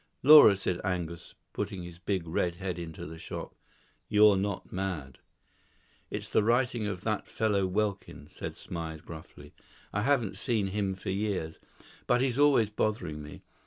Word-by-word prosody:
"Laura," 140 -8 +9
said 90 -2 -2
Angus, 85 -3 -4 0.2
putting 100 -3 -4
his 85 -1 -10
big 90 -2 -2
red 85 +1 0
head 90 -1 -4
into 80 -2 -7
the 80 +1 -9
shop, - - -7 0.6
"you're 105 -1 +6
not 100 0 -3
mad." 90 -9 -4 0.9
"It's - - -5
the - - +2
writing 120 0 +1
of 95 -3 -4
that 110 0 -2
fellow 105 -3 +1
Welkin," 100 -6 -2
said - - -7
Smythe 80 -2 -6
gruffly. 75 -2 -11 0.4
"I 105 - 0
haven't 120 -4 +1
seen 110 -6 0
him 95 -1 -1
for 95 - -4
years, 95 -5 -2 0.5
but 125 0 +3
he's 130 0 0
always 135 -8 +4
bothering 95 -8 -2
me. 75 0 -11
95 Hz, 155 wpm, -29 LUFS, 85-110 Hz, 0.9 s, Laura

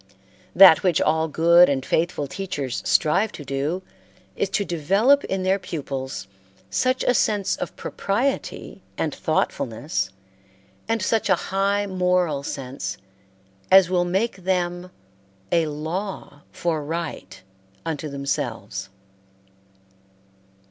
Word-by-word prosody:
That 185 -3 +9
which 180 -4 +2
all 160 +1 +2
good 170 +3 +5
and 135 -2 -1
faithful 165 -3 0
teachers 140 -6 -4
strive 195 +8 +2
to 145 - -9
do 145 +7 -2 0.5
is 195 - -1
to 200 +1 0
develop 195 - +3
in 190 -1 -2
their 190 +1 +2
pupils 135 - -5 0.4
such 255 - +1
a 250 - +3
sense 205 -4 +1
of - - -5
propriety 245 +8 -2 0.2
and - - -1
thoughtfulness 110 -4 -1 0.8
and 225 -3 0
such 220 +1 +1
a 190 - +6
high 200 +3 0
moral 180 -6 +1
sense 130 -7 -5 0.7
as 190 -1 +7
will 180 -1 +3
make 195 +5 0
them 180 -1 -2 0.6
a 165 -2 +3
law 160 +1 -5
for 170 -5 -2
right 155 - -5 0.4
unto 155 -1 -3
themselves. 115 -8 -4
175 Hz, 115 wpm, -23 LUFS, 145-190 Hz, 0.8 s, That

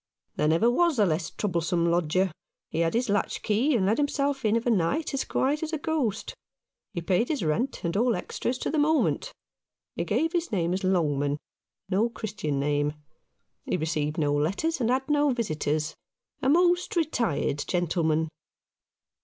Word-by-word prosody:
"There 150 - +1
never 165 +9 +3
was 320 +5 +3
a 210 - +5
less 165 -1 0
troublesome 170 -3 0
lodger. 175 +2 +1 0.4
He - - -2
had 165 +4 +1
his. 245 +2 +1
latch 205 -1 -1
key, 245 +7 +2
and 195 -5 +2
let 215 +6 +2
himself 280 -1 0
in 215 0 +3
of 230 - 0
a 245 - +3
night, 225 - 0
as 275 - 0
quiet 285 +3 0
as 320 0 -4
a - - +1
ghost. 290 -8 -2 0.6
He 170 - -4
paid 185 +7 +1
his 300 - -1
rent 210 - -1
and 170 0 -1
all 235 +3 +3
extras 250 - -3
to - - -1
the 310 - +1
moment. 315 +10 +2 0.6
He - - -1
gave 325 +1 0
his 345 -1 -1
name 175 -4 0
as 190 +2 -2
Longman 145 -6 +1 0.3
— 195 - -61
no 210 +5 +2
Christian 205 -11 -3
name. 145 +1 0 0.7
He - - 0
received 155 0 -1
no 145 -3 +1
letters 195 - 0
and 230 - +1
had 265 +2 +1
no 295 -1 +3
visitors 155 - -1 0.3
— - - -49
a 265 - +2
most 350 +4 +3
retired 235 - 0
gentle 175 -1 0
man." 160 0 +2
205 Hz, 180 wpm, -27 LUFS, 165-275 Hz, 0.7 s, a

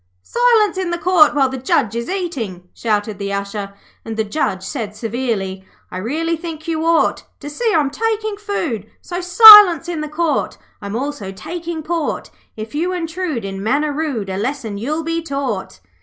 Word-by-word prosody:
'Silence 455 -5 +2
in 370 -2 -2
the 345 - -1
Court 340 -3 +4
while 275 -2 +3
the 260 0 -5
Judge 235 -3 0
is 235 +1 -4
eating,' 255 - -4
shouted 210 -2 -2
the 200 0 -3
Usher; 200 0 -4 0.3
and 225 -1 -6
the 220 - +1
Judge 205 -5 -2
said 215 -2 -5
severely 215 -5 -3 0.3
'I - - -5
really 320 - -1
think 320 -1 -8
you 320 -1 -1
ought 330 0 +1
To - - -9
see 455 +9 -1
I'm 295 -7 +1
taking 435 +3 -2
food, 335 - -4
So, 350 0 -5
Silence 365 -3 +9
in 340 -3 -3
the 305 - -5
Court! 315 +1 -1 0.2
(I'm 200 +1 -5
also 270 -6 -4
taking 335 - -6
port), 330 -1 -3 0.3
If 220 +3 -7
you 335 +5 -1
intrude, 330 - -3
in 195 0 -5
manner 285 +8 0
rude, 275 -10 -3
A 190 - -3
lesson 225 -2 -3
you'll 305 +8 -2
be 330 +1 -2
taught.' 260 - -4
290 Hz, 175 wpm, -18 LUFS, 215-340 Hz, 0.3 s, Silence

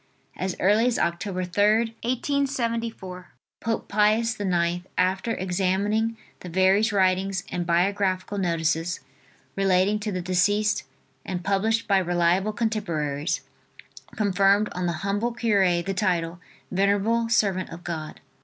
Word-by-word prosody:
As 185 -1 -3
early 210 +5 +4
as 245 - +1
Oct, 170 0 0
3d, 205 +4 +1
1874, 230 -7 -2 0.3
Pope 225 -1 -2
Pius 215 +2 +2
IX, 175 -2 0
after 190 +5 +1
examining 195 +5 0 0.2
the 180 - -8
various 190 +5 +3
writings 190 -1 +1
and 175 -1 -3
biographical 185 +2 +1
notices 165 -1 0 0.5
relating 195 +1 +2
to 210 0 -3
the 185 - -2
deceased 205 +4 +1 0.4
and 180 -2 -4
published 215 +4 +1
by 195 -2 +4
reliable 175 +3 +1
contemporaries, 170 -10 -2 0.7
conferred 200 0 +3
on 180 0 -2
the 170 - 0
humble 205 +4 0
cure 195 -7 +2
the 195 - -2
title 175 -4 -1 0.3
"Venerable 205 +4 +1
Servant 195 -5 +1
of 170 +1 -10
God." 160 -3 -6
195 Hz, 120 wpm, -25 LUFS, 180-215 Hz, 0.7 s, early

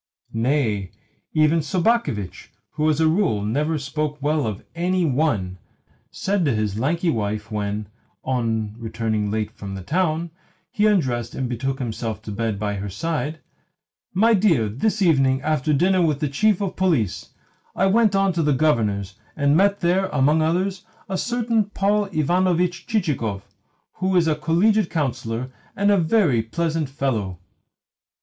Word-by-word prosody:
Nay, 115 -5 0 0.5
even 155 +1 +4
Sobakevitch 155 - -1 0.2
who 155 0 +1
as 155 0 +1
a 160 - +4
rule 160 - +1
never 150 +8 0
spoke 150 +1 -3
well 150 -1 0
of 105 -3 -5
ANY 180 +1 0
ONE 125 - 0 0.5
said 195 -1 -1
to 135 -6 +2
his 105 -1 -1
lanky 165 +7 +1
wife 105 -1 -3
when, 105 0 -3 0.4
on 115 -4 -1
returning 110 -2 -2
late 110 0 -2
from 100 -1 -8
the 95 - -7
town, 170 - 0 0.4
he 215 0 +2
undressed 125 - 0
and 130 - -2
betook 130 +3 -2
himself 115 -4 -4
to 105 - -6
bed 110 0 -2
by 105 0 -2
her 100 +1 -4
side: 155 - -3 0.7
"My 225 +5 +4
dear, 180 - +3
this 200 - 0
evening, 135 -6 +3
after 155 -1 0
dining 180 +4 +3
with 150 -3 0
the 150 - 0
Chief 205 +8 +2
of 195 -2 -2
Police, 155 - 0 0.5
I 190 - +2
went 210 +1 +3
on 195 -1 +2
to 170 - 0
the 150 -2 +2
Governor's, 105 -9 0 0.2
and 145 0 +2
met 200 +3 +3
there, 185 +2 +2
among 150 -1 +2
others, 185 +5 0 0.3
a 190 - -2
certain 230 0 0
Paul 205 +1 +1
Ivanovitch 180 +1 0
Chichikov, 140 - -1 0.5
who 190 +1 0
is 170 -2 +4
a 155 - +3
Collegiate 170 +7 +2
Councillor 130 -5 -2 0.2
and 200 +1 +2
a 200 - +4
very 160 - +3
pleasant 160 +5 -2
fellow." 115 -10 -2
150 Hz, 155 wpm, -22 LUFS, 115-185 Hz, 0.7 s, even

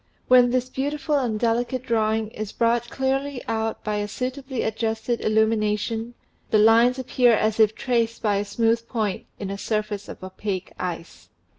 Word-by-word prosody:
When 250 -1 +6
this 255 0 0
beautiful 290 +3 -1
and 230 -5 -1
delicate 240 +2 0
drawing 220 -2 0
is 215 -2 -6
brought 235 0 +1
clearly 270 0 -1
out 225 0 -2
by 210 -1 -1
a 205 0 -2
suitably 260 +4 -4
adjusted 220 +1 -2
illumination, 220 +1 0 0.3
the 215 - +4
lines 230 +4 +5
appear 250 -2 +3
as 215 +1 0
if 220 -1 +4
traced 230 -2 0
by 205 -2 +2
a 205 - -1
smooth 230 +2 0
point 215 -6 -2
in 195 -1 -5
a 200 - -5
surface 210 -2 -3
of - - -9
opaque 190 0 -5
ice." 175 -2 -6
225 Hz, 160 wpm, -24 LUFS, 215-245 Hz, 0.3 s, When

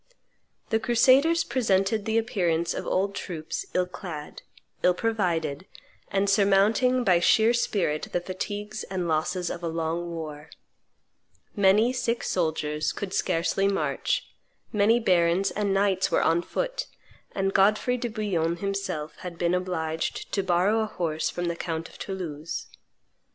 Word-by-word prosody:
The 220 - +3
crusaders 260 +8 +4
presented 215 -4 +1
the 220 0 +1
appearance 180 -8 0
of - - -5
old 195 +2 0
troops 165 -5 -5
ill 180 - +3
clad, 175 -5 -8 0.4
ill 180 0 +4
provided, 180 -8 -1 0.4
and 200 0 +1
surmounting 205 +6 +3
by 180 -6 +4
sheer 220 +6 +4
spirit 195 -10 0
the - - +1
fatigues 205 +4 -5
and 185 -2 -3
losses 165 +3 0
of 175 - -6
a 170 - -3
long 165 +1 -2
war; 155 -2 -7 1.1
many 210 +4 +4
sick 240 -2 -1
soldiers 155 -3 -1
could 195 -2 -5
scarcely 180 +2 +1
march; 200 - 0 0.5
many 215 +3 +4
barons 180 -2 +2
and 205 -1 -1
knights 195 -1 +2
were - - +2
on 165 +1 +3
foot; - - -3 0.5
and 195 0 0
Godfrey 210 +5 +3
de 240 - -2
Bouillon 195 -7 -1
himself 195 -5 -3
had 175 -2 -8
been 170 0 +1
obliged 165 -3 -2
to 200 - +2
borrow 190 +4 +2
a 220 - 0
horse 165 -6 -2
from 175 - -3
the 170 0 -1
count 165 -1 -4
of - - -16
Toulouse. 165 -6 -5
190 Hz, 140 wpm, -26 LUFS, 170-215 Hz, 1.1 s, crusaders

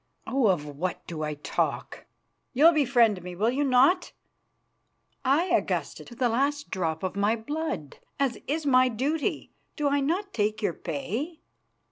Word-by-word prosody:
Oh! 265 -3 +2
of 175 -7 +1
what 150 +5 -4
do 160 -2 -6
I 150 -1 -2
talk? 145 - -3 0.5
You'll 310 +6 +6
befriend 240 - +3
me, 180 0 -7
will 215 +6 +1
you 280 +3 0
not?" 275 +7 +3 1.1
"Aye, 300 +7 +2
Augusta, - - -2
to 240 - -12
the 245 +1 +1
last 280 +5 0
drop 165 -3 -2
of 185 - -2
my 205 +3 +2
blood, 235 - -4 0.2
as 275 -3 0
is 310 +2 -1
my 255 -2 +5
duty. 275 +7 -2 0.2
Do 295 -2 +1
I 285 0 +2
not 355 +8 -1
take 215 0 0
your 205 -6 0
pay?" 210 - -4
250 Hz, 155 wpm, -27 LUFS, 185-290 Hz, 1.1 s, You'll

